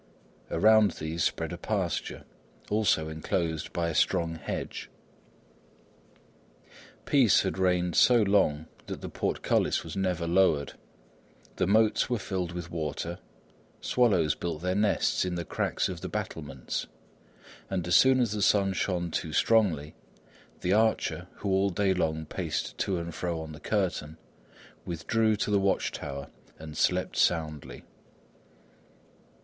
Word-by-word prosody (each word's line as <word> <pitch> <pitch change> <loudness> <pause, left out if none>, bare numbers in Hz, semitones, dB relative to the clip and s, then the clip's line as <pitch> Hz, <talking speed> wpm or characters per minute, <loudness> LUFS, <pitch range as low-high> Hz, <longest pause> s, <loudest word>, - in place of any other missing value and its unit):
Around 110 -1 +5
these 80 +2 -3
spread - - -1
a - - -7
pasture, - - -2 0.5
also 105 -7 +2
enclosed 80 0 -2
by 85 -1 -1
a 85 - -2
strong 80 +2 +1
hedge. 80 -3 -5 2.2
Peace 130 -7 +4
had - - -3
reigned 90 -2 +1
so 120 -3 +6
long 95 -7 +2 0.2
that - - -6
the - - -6
portcullis - - 0
was - - -7
never 90 -3 -1
lowered; 85 -4 +2 0.8
the - - +1
moats 110 +3 +3
were 120 - +1
filled 95 -5 -3
with 85 -1 -6
water; 80 +1 -4 0.6
swallows 95 -11 +2
built 85 -2 -5
their 90 0 0
nests 105 +1 +1
in 90 -1 -2
the 85 -1 -4
cracks - - -1
of - - -6
the - - -5
battlements, 70 -5 -4 0.8
and 90 -3 -2
as 90 - +3
soon 130 0 +6
as 120 -4 +1
the 105 -1 -2
sun 100 -1 +3
shone 90 -3 -1
too 80 0 -3
strongly, 85 -7 +2 0.7
the 90 - +1
archer 110 +1 +1
who - - -4
all 95 +1 +3
day 95 +1 +1
long 80 -3 -1
paced - - -3
to 95 -2 0
and 85 0 -5
fro 85 -1 -3
on 80 -1 -7
the 75 - -10
curtain, 90 -7 -2 0.7
withdrew 110 +6 0
to 105 - -2
the 100 - +4
watch 95 0 +1
tower 70 -1 -6 0.3
and 80 -1 -9
slept 90 +3 +1
soundly. 75 -7 0
90 Hz, 140 wpm, -28 LUFS, 80-100 Hz, 2.2 s, so